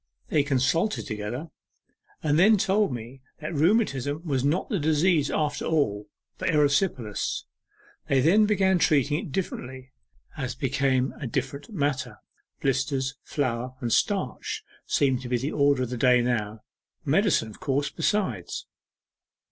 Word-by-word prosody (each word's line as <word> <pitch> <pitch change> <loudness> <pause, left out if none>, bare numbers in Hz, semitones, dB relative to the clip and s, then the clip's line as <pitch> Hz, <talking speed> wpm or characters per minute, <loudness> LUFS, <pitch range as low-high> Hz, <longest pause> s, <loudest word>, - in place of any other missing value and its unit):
They 150 - +3
consulted 145 +9 +1
together 110 +6 -5 0.7
and 150 0 +2
then 210 +4 +6
told 200 -1 +2
me 120 +2 -7 0.2
that 155 +2 -5
rheumatism 155 - +1
was 135 -5 0
not 155 +6 +1
the 205 -7 -1
disease 155 0 +2
after 150 -1 -1
all, 105 -11 0 0.3
but - - -1
erysipelas. 145 - +1 0.6
They 135 - +3
then 195 +10 +5
began 190 -3 +3
treating 145 -1 +2
it - - -8
differently, 130 -6 -5 0.4
as 125 -4 -4
became 135 -1 +1
a 140 - -4
different 140 +4 -3
matter. 135 - -2 0.4
Blisters, 135 0 0
flour, 125 -2 -2
and 120 -3 -1
starch, 205 - -1 0.2
seem 130 -3 +2
to 125 -1 -7
be 125 - +2
the 135 +5 -3
order 140 -2 +3
of 125 - -4
the 125 - -3
day 125 0 +4
now 110 -3 -1 0.4
medicine, 110 - +2
of - - -15
course, 140 +1 -1
besides. 155 - -1
140 Hz, 140 wpm, -26 LUFS, 125-160 Hz, 0.7 s, then